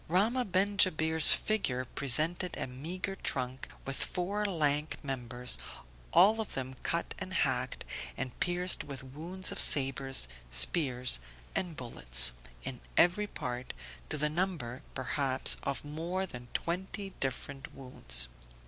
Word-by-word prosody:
Rahmah 220 +9 +2
ben 200 +3 +2
Jabir's 160 -4 +7
figure 135 -13 +1
presented 155 +8 +1
a - - -2
meagre 170 +10 -5
trunk, 130 -4 -3 0.2
with 135 -1 -3
four 200 +4 -2
lank 150 -5 0
members, 125 -2 +4 0.5
all 210 +5 +5
of 220 - -7
them 130 -1 -4
cut - - -2
and - - -4
hacked, - - -1 0.3
and 130 -2 -4
pierced 180 +1 +2
with 140 -2 -7
wounds 165 +8 -3
of - - -6
sabres, 135 - +2 0.2
spears 125 - +3 0.3
and 175 -4 -3
bullets, - - +2 0.3
in 125 -2 -5 0.2
every 185 +5 +4
part, 125 -7 -5 0.4
to - - 0
the 150 +1 +2
number, 155 -7 -3
perhaps 130 +1 +1
of 140 +1 -4
more 170 +6 -3
than 125 -8 -10
twenty 190 +3 -4
different 135 +1 -4
wounds. 65 - 0
145 Hz, 130 wpm, -31 LUFS, 130-180 Hz, 0.5 s, Jabir's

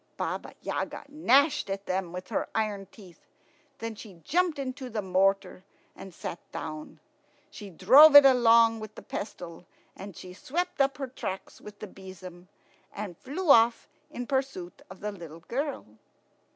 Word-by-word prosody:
Baba - - -4
Yaga - - -4
gnashed 285 -3 +3
at 195 +1 -4
them 185 -2 -2
with 180 +1 -8
her - - -2
iron 210 -3 -2
teeth. 185 -6 -17 0.5
Then 225 0 -5
she 210 -3 -12
jumped 350 - +1
into 260 -1 -5
the 215 -3 -3
mortar 190 0 +1 0.3
and 195 - -10
sat 170 0 -7
down. 155 0 -7 0.5
She 205 -2 -10
drove 260 - +7
it 285 -1 +11
along 230 -3 +5
with 215 -1 -9
the - - -11
pestle, 175 -4 -7 0.3
and 195 -2 -10
swept 275 - -4
up 275 0 +1
her 275 - -3
tracks 195 -6 -7
with 210 0 -12
a - - -5
besom, 185 -2 -12 0.4
and 200 -4 -7
flew 300 - -1
off 230 -2 +4 0.2
in 245 -5 -6
pursuit 265 -10 -3
of 190 - -12
the 210 +1 -3
little 170 -4 -11
girl. 275 - -4
210 Hz, 150 wpm, -28 LUFS, 185-265 Hz, 0.5 s, it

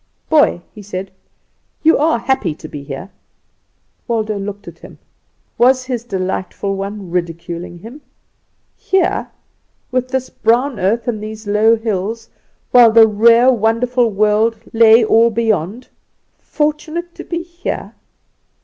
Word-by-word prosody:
"Boy," 295 - +3
he 215 - -11
said, 195 -1 -6 0.7
"you 320 +1 +5
are 310 -2 +2
happy 240 - -1
to 155 - -10
be 145 - -8
here." 140 +8 -8 1.0
Waldo 220 -3 -1
looked 200 +1 -7
at - - -11
him. - - -14 0.6
Was 255 +1 +4
his 250 -3 -3
delightful 190 -1 -3
one 195 -1 -6
ridiculing 170 0 -4
him? 230 - -12 0.7
Here, 380 -2 0 0.6
with 255 0 0
this 260 0 -3
brown 240 +2 +1
earth 220 +7 0
and 220 -3 -2
these 215 +1 -8
low 210 +2 +3
hills, 220 0 -4 0.4
while 240 -2 +7
the 225 0 +7
rare 230 +4 +5
wonderful 235 +2 +1
world 215 +2 +1 0.2
lay 225 0 +6
all 225 +2 +4
beyond. 220 0 -2 0.5
Fortunate 310 +3 -3
to - - -9
be 340 -1 -4
here? 345 +1 -6
225 Hz, 130 wpm, -17 LUFS, 200-250 Hz, 1.0 s, while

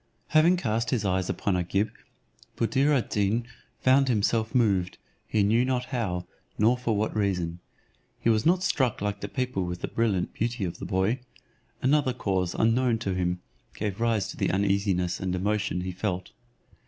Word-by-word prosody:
Having 165 +4 +5
cast 115 -5 -1
his 120 -6 0
eyes 95 -1 0
upon 100 - 0
Agib, 95 +4 0 0.7
Buddir 130 +6 +2
ad 135 -5 +1
Deen 105 +3 +1 0.4
found 135 +1 +4
himself 110 0 +1
moved, 100 -7 +2 0.3
he 105 -2 +2
knew 115 +4 +3
not 125 -1 0
how, 90 -8 -1 0.3
nor 115 +4 +4
for 120 -4 -1
what 110 +1 -1
reason. 90 -5 -1 0.6
He - - -2
was 110 -2 +3
not 180 +3 +3
struck 130 - +1
like 100 0 -3
the 100 - -3
people 125 -5 -2
with 90 0 -4
the - - -2
brilliant 105 -6 0
beauty 115 -2 -1
of 85 - -5
the - - -5
boy; 100 +6 +1 0.6
another 135 -1 +3
cause 95 -7 -1
unknown 115 +1 +2
to 100 -4 -2
him 90 -1 -1 0.3
gave 105 0 -3
rise 115 -4 +1
to - - -8
the - - +1
uneasiness 95 -2 +1
and 95 -1 -1
emotion 100 -1 0
he 90 0 -3
felt. 90 -1 -3
105 Hz, 170 wpm, -27 LUFS, 95-120 Hz, 0.7 s, Having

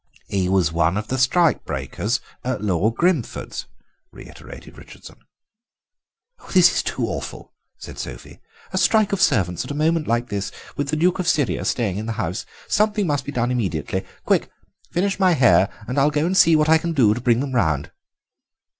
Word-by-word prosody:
"He 95 -2 -1
was 95 -4 +2
one 85 +3 +1
of 110 +1 -4
the 130 - -1
strike 165 +6 +3
breakers 110 +7 -3 0.2
at 125 -4 -3
Lord 105 +3 +1
Grimford's," 170 -7 -1 0.4
reiterated - - -12
Richardson. - - -14 1.4
"This 180 -1 +7
is - - +1
too - - -2
awful," - - -6 0.2
said - - -10
Sophie; - - -8 0.3
"a 185 - +1
strike 205 +2 +3
of 195 - 0
servants 90 -4 +2
at - - -10
a 145 - -4
moment 160 +1 +1
like 120 +1 0
this, 100 -1 -3 0.2
with 145 - -2
the 155 - 0
Duke 180 +4 +1
of 180 - -2
Syria 125 - +1
staying 105 -6 -1
in 110 - -5
the 115 - -2
house. 110 -1 -4 0.2
Something 210 -1 +1
must 145 -4 -1
be 145 - -5
done 120 -2 -1
immediately. 95 - -2 0.2
Quick, - - +1 0.4
finish 195 +4 -1
my 185 -2 +4
hair 125 - +4 0.2
and 130 +3 -1
I'll 140 +2 +4
go 150 +1 0
and 185 +2 0
see 165 -3 +6
what 155 0 +3
I 160 0 +5
can 170 +1 -3
do 115 -9 +4
to 125 - -5
bring 120 -1 +2
them 135 0 -3
round." 80 - 0
130 Hz, 185 wpm, -22 LUFS, 105-165 Hz, 1.4 s, This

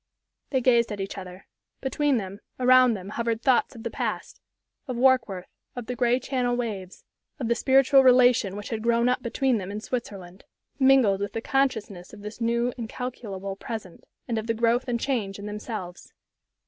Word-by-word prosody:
They 260 -2 +1
gazed 235 -2 +3
at 205 - -5
each 195 0 -4
other. 185 -1 -9 0.3
Between 275 0 +1
them, 195 -1 -5 0.2
around 255 -1 +5
them 190 0 -8
hovered 230 +1 -2
thoughts 260 0 +2
of 225 - -10
the - - -4
past - - -4 0.5
of 255 - -3
Warkworth, 240 -8 +2 0.3
of 245 -2 -6
the 250 - -4
gray 245 0 +2
Channel 250 -2 -1
waves, 205 -6 -5 0.3
of 255 -6 -3
the 235 - +3
spiritual 270 +2 +5
relation 250 -6 +5
which 205 0 -7
had 225 -2 -3
grown 235 +1 +2
up 250 0 +1
between 245 0 0
them 190 -1 -6
in 210 - -4
Switzerland, 195 -6 -6 0.4
mingled 260 -8 +4
with 200 0 -3
the - - -2
consciousness 220 -10 -1
of 210 - -11
this 210 +3 -8
new, 235 +1 +1
incalculable 220 -5 -5
present, 200 -3 -7 0.2
and 230 -2 -1
of 220 - -6
the 230 - 0
growth 235 +3 +1
and 240 -1 -1
change 230 -8 -2
in 200 - -8
themselves. 210 -4 -7
235 Hz, 180 wpm, -26 LUFS, 205-250 Hz, 0.5 s, around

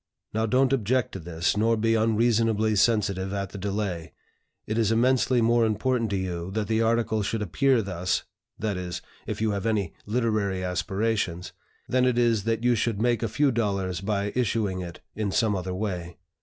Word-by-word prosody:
Now 110 +1 0
don't 130 +3 +3
object 125 0 +1
to 95 - -6
this, 85 +1 -1
nor 115 +2 +2
be 115 +1 +2
unreasonably 110 -1 +2
sensitive 100 -3 +2
at 100 -1 -2
the 100 - -7
delay. 95 -4 -3 0.5
It 110 +2 -1
is 110 -2 +2
immensely 125 +1 +3
more 120 +1 +4
important 115 +2 +1
to 100 - -1
you 90 -2 -3
that 110 -2 -1
the 110 +1 +1
article 115 -1 +1
should 105 +1 -1
appear 115 - +2
thus 90 -2 -1 0.3
(that 105 -3 -2
is, 90 -1 -5 0.2
if - - -4
you 110 -1 +2
have 100 +2 -2
any 105 -6 0
literary 105 -5 0
aspirations) 95 0 -1 0.3
than 130 0 +2
it 125 -2 +2
is 115 -4 +2
that 115 0 0
you 125 0 +4
should 115 -2 0
make 120 -1 +2
a 115 - -1
few 140 +5 +2
dollars 100 -6 -1
by 100 0 -1
issuing 105 -6 0
it 85 -1 -8
in 105 -1 -2
some 110 0 +2
other 90 0 -3
way. 90 -4 -4
110 Hz, 185 wpm, -26 LUFS, 95-115 Hz, 0.5 s, more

